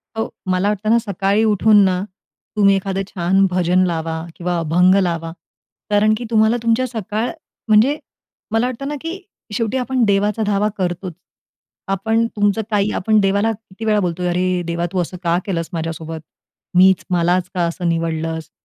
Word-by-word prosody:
हो, 225 Hz, -, -2 dB, 0.2 s
मला 185 Hz, +2 st, +1 dB
वाटतं 210 Hz, +1 st, -2 dB
ना, 230 Hz, -, +5 dB
सकाळी 200 Hz, 0 st, 0 dB
उठून 215 Hz, 0 st, +4 dB
ना, 185 Hz, 0 st, 0 dB, 0.5 s
तुम्ही 200 Hz, -2 st, +4 dB
एखादं 195 Hz, 0 st, -2 dB
छान 190 Hz, +2 st, +2 dB
भजन 180 Hz, +1 st, +2 dB
लावा 160 Hz, -1 st, -3 dB
किंवा 175 Hz, -1 st, -2 dB
अभंग 180 Hz, +4 st, +3 dB
लावा. 165 Hz, -2 st, -2 dB, 0.6 s
कारण 210 Hz, +1 st, +3 dB
की 240 Hz, -, -6 dB
तुम्हाला 220 Hz, +1 st, +3 dB
तुमच्या 230 Hz, +3 st, +2 dB
सकाळ, 220 Hz, 0 st, -3 dB, 0.4 s
म्हणजे 225 Hz, +8 st, +4 dB, 0.5 s
मला 225 Hz, +2 st, +2 dB
वाटतं 255 Hz, +2 st, -5 dB
ना, 295 Hz, -, -3 dB
की 335 Hz, +4 st, -5 dB, 0.3 s
शेवटी 230 Hz, +3 st, -1 dB
आपण 255 Hz, 0 st, 0 dB
देवाचा 205 Hz, +1 st, +1 dB
धावा 205 Hz, +1 st, +1 dB
करतोच. 180 Hz, -1 st, -3 dB, 0.8 s
आपण 220 Hz, +4 st, +1 dB
तुमचं 205 Hz, +1 st, +1 dB
काही, 205 Hz, 0 st, +1 dB
आपण 215 Hz, +2 st, +2 dB
देवाला 200 Hz, +2 st, +2 dB
किती 225 Hz, 0 st, -9 dB
वेळा 210 Hz, -1 st, +3 dB
बोलतोय, 180 Hz, +1 st, -2 dB
"अरे 180 Hz, 0 st, 0 dB
देवा, 170 Hz, 0 st, -1 dB
तू 185 Hz, -, -1 dB
असं 180 Hz, +2 st, -5 dB
का 170 Hz, 0 st, +2 dB
केलंस 165 Hz, -4 st, -2 dB
माझ्यासोबत? 160 Hz, 0 st, -4 dB, 0.6 s
मीच 190 Hz, 0 st, +5 dB
मलाच 180 Hz, +1 st, +1 dB
का 180 Hz, -, -1 dB
असं 170 Hz, +1 st, -2 dB
निवडलंस? 165 Hz, -1 st, -2 dB
195 Hz, 160 wpm, -19 LUFS, 175-215 Hz, 0.8 s, ना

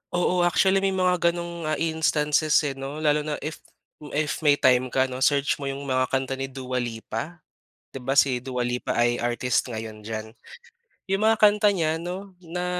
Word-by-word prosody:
Oo, 180 Hz, 0 st, +1 dB
actually 190 Hz, +2 st, +3 dB
may 195 Hz, 0 st, 0 dB
mga 180 Hz, -1 st, +2 dB
ganong, 170 Hz, -1 st, -6 dB
ah, 155 Hz, -, +1 dB
instances, 155 Hz, -1 st, +1 dB
eh, 145 Hz, -, -1 dB
no, 135 Hz, +2 st, -6 dB
lalo 150 Hz, 0 st, +2 dB
na 150 Hz, -, -1 dB
if 155 Hz, +1 st, -5 dB, 0.6 s
if 150 Hz, 0 st, -1 dB
may 145 Hz, -2 st, +4 dB
time 130 Hz, -2 st, +3 dB
ka 130 Hz, +1 st, +1 dB
'no, 130 Hz, -1 st, -4 dB
search 140 Hz, +1 st, +2 dB
mo 140 Hz, -, -4 dB
yung 135 Hz, +1 st, -4 dB
mga 130 Hz, -1 st, 0 dB
kanta 135 Hz, 0 st, -2 dB
ni 135 Hz, -, -2 dB
Dua 130 Hz, -1 st, -4 dB
Lipa, 120 Hz, +7 st, -5 dB, 0.5 s
'di 135 Hz, -, -7 dB
ba 135 Hz, +2 st, -2 dB
si 135 Hz, -3 st, +4 dB
Dua 125 Hz, 0 st, -3 dB
Lipa 125 Hz, 0 st, -2 dB
ay 120 Hz, 0 st, +2 dB
artist 120 Hz, +1 st, 0 dB
ngayon 110 Hz, -2 st, -6 dB
diyan. 110 Hz, 0 st, -6 dB, 0.8 s
Yung 195 Hz, -, +1 dB
mga 220 Hz, 0 st, +4 dB
kanta 210 Hz, 0 st, +5 dB
niya 165 Hz, -4 st, 0 dB
'no, 185 Hz, +3 st, -6 dB
na 180 Hz, +1 st, -4 dB
145 Hz, 190 wpm, -25 LUFS, 125-170 Hz, 0.8 s, kanta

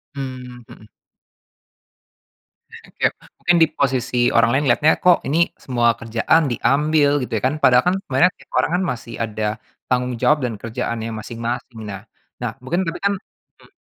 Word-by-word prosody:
Mmm, 125 Hz, -2 st, -7 dB
mhm. 110 Hz, -, -14 dB, 2.1 s
Kayak -, -, +2 dB, 0.3 s
mungkin 175 Hz, 0 st, +3 dB
di -, -, +4 dB
posisi 130 Hz, -3 st, -1 dB, 0.2 s
orang 115 Hz, 0 st, +5 dB
lain 145 Hz, +2 st, +1 dB
lihatnya 150 Hz, +6 st, +4 dB
kok 180 Hz, -1 st, +5 dB
ini 165 Hz, +4 st, +3 dB
semua 120 Hz, -2 st, +1 dB
kerjaan 120 Hz, +6 st, +1 dB
diambil 150 Hz, +3 st, +2 dB
gitu -, -, -7 dB
ya -, -, -18 dB
kan 145 Hz, -, -2 dB
padahal 125 Hz, 0 st, +6 dB
kan 185 Hz, -, +1 dB
sebenarnya 170 Hz, +8 st, +3 dB
tiap -, -, -21 dB
orang -, -, 0 dB
kan 190 Hz, -, -1 dB
masih 115 Hz, -1 st, -7 dB
ada 110 Hz, -1 st, -2 dB, 0.4 s
tanggung 125 Hz, 0 st, 0 dB
jawab 150 Hz, -3 st, +3 dB
dan 120 Hz, -2 st, -1 dB
kerjaannya 115 Hz, -1 st, -4 dB
masing-masing 115 Hz, +1 st, -5 dB
nah 100 Hz, -1 st, -6 dB, 0.4 s
nah 120 Hz, -, -1 dB
mungkin 175 Hz, +9 st, -1 dB
tapi 165 Hz, +1 st, -4 dB
kan, 200 Hz, 0 st, +2 dB, 0.4 s
mhm. -, -, -20 dB
125 Hz, 155 wpm, -20 LUFS, 115-150 Hz, 2.1 s, padahal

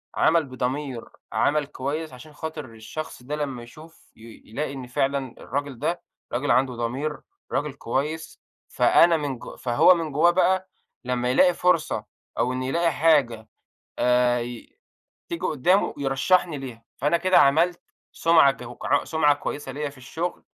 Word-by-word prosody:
عمل 165 Hz, 0 st, +3 dB
بضمير، 130 Hz, -1 st, -3 dB, 0.3 s
عمل 150 Hz, 0 st, +2 dB
كويس، 145 Hz, +3 st, -4 dB
عشان 140 Hz, +5 st, -13 dB
خاطر 155 Hz, -1 st, -6 dB
الشخص 120 Hz, +4 st, -8 dB
ده 145 Hz, +4 st, -4 dB
لمّا 135 Hz, -5 st, -4 dB
يشوف 155 Hz, +7 st, -16 dB
ي 115 Hz, 0 st, -14 dB
يلاقي 140 Hz, +6 st, -4 dB
إن 130 Hz, -2 st, -7 dB
فعلًا 135 Hz, 0 st, -1 dB
الراجل 140 Hz, -1 st, -4 dB
ده 175 Hz, +7 st, -1 dB, 0.3 s
راجل 130 Hz, +4 st, 0 dB
عنده 130 Hz, +1 st, +3 dB
ضمير، 130 Hz, +6 st, -3 dB, 0.3 s
راجل 145 Hz, 0 st, -1 dB
كويس، 145 Hz, +5 st, -3 dB, 0.3 s
فأنا 170 Hz, -1 st, +5 dB
من 140 Hz, -5 st, -4 dB
جو -, -, -9 dB
فهو 120 Hz, +8 st, +5 dB
من 165 Hz, -3 st, -3 dB
جوّاه 160 Hz, +5 st, +4 dB
بقى 185 Hz, +1 st, +2 dB, 0.3 s
لمّا 125 Hz, -1 st, -1 dB
يلاقي 180 Hz, +7 st, +5 dB
فرصة 175 Hz, -2 st, +1 dB, 0.3 s
أو 125 Hz, -, +1 dB
إن 130 Hz, 0 st, -3 dB
يلاقي 165 Hz, +6 st, +1 dB
حاجة 140 Hz, -9 st, +2 dB, 0.5 s
آآ، 125 Hz, 0 st, +3 dB
ي 120 Hz, -, -8 dB, 0.5 s
تيجي 340 Hz, -1 st, -4 dB
قدّامه 175 Hz, +7 st, +2 dB
يرشحني 145 Hz, +4 st, +1 dB
ليها، 125 Hz, -4 st, -8 dB
فأنا 145 Hz, +5 st, +2 dB
كده 185 Hz, +2 st, +3 dB
عملت 165 Hz, +5 st, +4 dB, 0.3 s
سُمعة 165 Hz, -4 st, +5 dB
كو 125 Hz, -3 st, -10 dB
ع 145 Hz, -, +2 dB
سُمعة 160 Hz, -2 st, +3 dB
كويسة 145 Hz, -1 st, -5 dB
ليّا 145 Hz, +2 st, -3 dB
في 140 Hz, -, -16 dB
الشغل، 160 Hz, +7 st, -5 dB
145 Hz, 150 wpm, -24 LUFS, 125-160 Hz, 0.5 s, فأنا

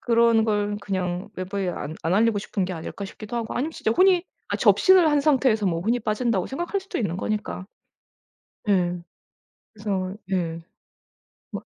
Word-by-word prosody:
'그런 230 Hz, -1 st, +4 dB
걸 205 Hz, -1 st, 0 dB
그냥 185 Hz, -1 st, -3 dB
외부에 185 Hz, 0 st, -3 dB
안 155 Hz, -3 st, -4 dB
안 165 Hz, +4 st, +1 dB
알리고 220 Hz, 0 st, +3 dB
싶은 200 Hz, -2 st, -2 dB
게 185 Hz, -, -4 dB
아닐까.' 175 Hz, +4 st, -6 dB
싶기도 215 Hz, +4 st, -7 dB
하고 230 Hz, -1 st, -3 dB
아니면 300 Hz, +6 st, -1 dB
진짜 220 Hz, -, -1 dB
혼이 365 Hz, +6 st, +4 dB, 0.3 s
아 -, -, -1 dB
접신을 370 Hz, -4 st, +5 dB
한 295 Hz, -1 st, +3 dB
상태에서 260 Hz, -8 st, +3 dB
뭐 165 Hz, -2 st, 0 dB
혼이 230 Hz, +6 st, +1 dB
빠진다고 215 Hz, -3 st, 0 dB
생각할 345 Hz, +8 st, -2 dB
수도 385 Hz, -, -5 dB
있는 185 Hz, -7 st, -1 dB
거니까. 210 Hz, -2 st, -3 dB, 1.0 s
예. 180 Hz, -3 st, +2 dB, 0.8 s
그래서 195 Hz, -3 st, -2 dB, 0.2 s
예. 165 Hz, -3 st, -1 dB, 0.9 s
막 -, -, -5 dB
210 Hz, 320 characters per minute, -24 LUFS, 185-240 Hz, 1.0 s, 접신을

